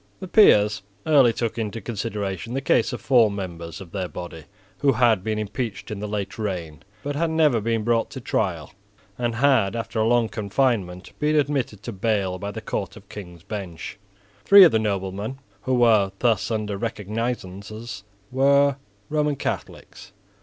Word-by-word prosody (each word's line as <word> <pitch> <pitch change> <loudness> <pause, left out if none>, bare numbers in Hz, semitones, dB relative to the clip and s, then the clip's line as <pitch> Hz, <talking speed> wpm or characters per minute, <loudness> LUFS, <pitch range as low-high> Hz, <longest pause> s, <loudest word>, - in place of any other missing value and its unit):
The 190 - -7
peers 105 - +5 0.2
early 140 -6 +5
took 115 0 -3
into 110 0 -3
consideration 105 -1 -4
the - - +1
case 125 -3 +2
of 120 - -5
four 120 -5 +4
members 85 -4 -6
of 95 -4 -11
their 95 -1 -3
body 85 -3 -8 0.3
who 140 -1 +3
had 115 -5 +3
been 110 0 -1
impeached 105 +1 -4
in 105 - -4
the 105 - -4
late 105 0 -4
reign, 85 -8 -4 0.2
but 145 0 -3
had 165 +3 0
never 155 -8 +3
been 115 0 0
brought 115 0 +1
to - - -7
trial, - - -2 0.5
and 120 -2 -1
had, 120 -5 +3
after 115 -1 -3
a 110 - +2
long 120 -1 +3
confinement, 100 -3 -1
been 150 +1 +1
admitted 140 -8 0
to 120 - -5
bail 100 -3 -1
by 100 +1 -4
the 105 - -6
Court - - -4
of - - -16
King's 90 -4 -10
Bench. 95 -4 -7 0.4
Three 200 0 +9
of 170 - +7
the 110 - +2
noblemen 100 +3 -3 0.2
who 130 +4 0
were 110 -5 +4
thus 115 -3 +1
under 105 -3 -2
recognisances 110 -1 -4 0.3
were 140 +1 +4 0.3
Roman 150 -1 0
Catholics. 100 - -6
110 Hz, 165 wpm, -24 LUFS, 100-125 Hz, 0.5 s, Three